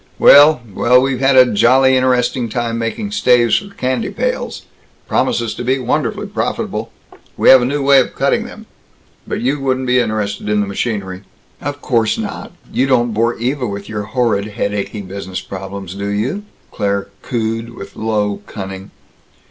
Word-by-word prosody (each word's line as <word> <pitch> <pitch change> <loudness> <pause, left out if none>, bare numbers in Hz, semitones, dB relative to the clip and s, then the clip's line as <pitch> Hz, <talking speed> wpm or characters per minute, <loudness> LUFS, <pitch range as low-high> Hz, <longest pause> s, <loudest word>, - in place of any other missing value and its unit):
Well 145 -2 +7
Well, 125 +6 +4
we've 130 -1 0
had 135 0 +3
a 125 -3 +6
jolly 130 +5 +4
interesting 125 -1 +1
time 115 +1 -2
making 115 - -3
staves 125 - +3
for 200 -1 -12
candy 130 - -1
pails - - -3 0.4
promises 115 -2 0
to - - -6
be 130 +2 +1
wonderfully 125 - -1
profitable. - - -3 0.5
We - - +4
have 130 -1 +9
a - - +1
new 140 +2 -1
way 140 0 +6
of 130 - -1
cutting - - +1
them. - - -11 0.6
But - - -3
you 135 +4 0
wouldn't 130 -1 -1
be 125 0 +3
interested 105 -3 -2
in 105 0 +2
the 105 - +1
machinery." 100 -2 -3 0.4
"Of 145 0 -5
course 115 -3 +1
not. 220 -2 -5 0.2
You 130 - +2
don't 120 -3 +2
bore 115 +2 0
Eva 125 +2 -1
with 100 -1 -6
your 105 -1 -4
horrid, 110 -2 0
headachy 105 -1 -3
business 95 -1 -6
problems, 95 -1 -7
do 100 +1 -5
you?" 115 - -2 0.3
Claire 100 -1 -2
cooed, 115 0 -3
with 100 - -10
low 105 -2 -1
cunning. 95 -1 -7
120 Hz, 165 wpm, -17 LUFS, 105-130 Hz, 0.6 s, have